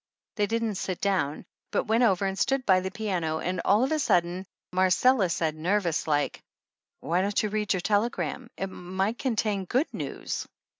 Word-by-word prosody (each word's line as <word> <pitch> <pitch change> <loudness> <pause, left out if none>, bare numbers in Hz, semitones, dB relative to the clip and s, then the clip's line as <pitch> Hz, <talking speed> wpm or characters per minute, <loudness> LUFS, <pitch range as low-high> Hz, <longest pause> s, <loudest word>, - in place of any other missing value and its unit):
They 205 -2 0
didn't 225 -3 -1
sit 185 -2 -3
down, 185 -8 0 0.2
but - - 0
went 225 +2 +2
over 195 -4 +3
and 195 0 -1
stood 270 +5 +1
by 185 -2 +5
the 190 +1 -3
piano 180 -6 -2
and 180 +1 -2
all 210 +4 +4
of 265 - 0
a 310 - +2
sudden 180 - +1 0.3
Marcella 190 +3 +4
said 160 -2 0
nervous 170 +1 0
like: 145 -1 0 0.6
"Why 175 +3 +1
don't 200 +2 +1
you 215 - 0
read 210 0 -1
your 185 - -2
telegram? 225 +4 -1
It 195 - -1
might 190 +4 -3
contain 215 -6 0
good 260 - 0
news." - - -4
195 Hz, 180 wpm, -27 LUFS, 180-220 Hz, 0.6 s, by